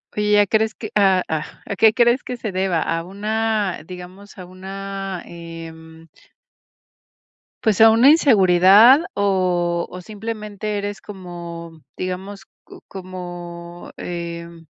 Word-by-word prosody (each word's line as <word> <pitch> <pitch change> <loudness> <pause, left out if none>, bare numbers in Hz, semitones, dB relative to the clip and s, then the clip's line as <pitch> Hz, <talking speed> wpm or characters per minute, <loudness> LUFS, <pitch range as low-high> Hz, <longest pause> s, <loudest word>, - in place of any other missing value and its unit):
Oye, 210 0 +3
¿a 205 - +3
crees 220 +1 +1
que 215 - -8
a 190 -3 +4
ah 155 -1 -2 0.2
a 200 - -4
qué 220 +3 +5
crees 240 +1 +3
que 250 - -6
se 220 -3 -4
deba? 185 -3 0
A 165 0 -2
una, 210 0 -2
digamos 185 +3 -11
a 180 - -9
una 195 0 -7
em 165 -1 -11 1.6
Pues 220 -4 +2
a 225 0 +9
una 235 +5 +6
inseguridad 220 - +6
o 180 -3 0
o 180 - -9
simplemente 210 0 -5
eres 205 0 -4
como, 170 -4 -9 0.2
digamos, 190 +2 -6 0.2
cu - - -14
como 175 -2 -9
em 170 -1 -7
190 Hz, 125 wpm, -21 LUFS, 175-210 Hz, 1.6 s, a